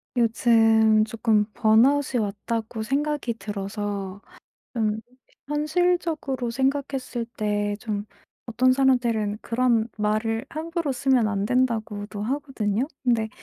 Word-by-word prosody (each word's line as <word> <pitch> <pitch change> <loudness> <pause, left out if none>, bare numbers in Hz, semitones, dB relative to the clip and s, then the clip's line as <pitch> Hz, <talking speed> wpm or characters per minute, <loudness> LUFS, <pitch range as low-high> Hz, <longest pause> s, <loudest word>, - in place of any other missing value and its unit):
요즘 225 -2 +4
쪼끔 220 -1 +1
번아웃이 245 +4 +3
왔다고 220 +2 -3
생각이 280 0 -1
들어서 200 -1 -4 0.6
좀 220 -2 0 0.5
현실적으로 305 -4 0
생각했을 265 -1 -1
때 205 -1 -1
좀 210 -3 -3 0.4
어떤 255 +2 +3
사람들은 240 -6 +1
그런 235 -1 +1
말을 215 +2 0
함부로 330 0 -3
쓰면 255 -3 +2
안 200 -1 -1
된다고도 220 -4 -1
하거든요? 255 -2 -1 0.2
근데 230 -3 +2
230 Hz, 245 characters per minute, -24 LUFS, 215-265 Hz, 0.6 s, 요즘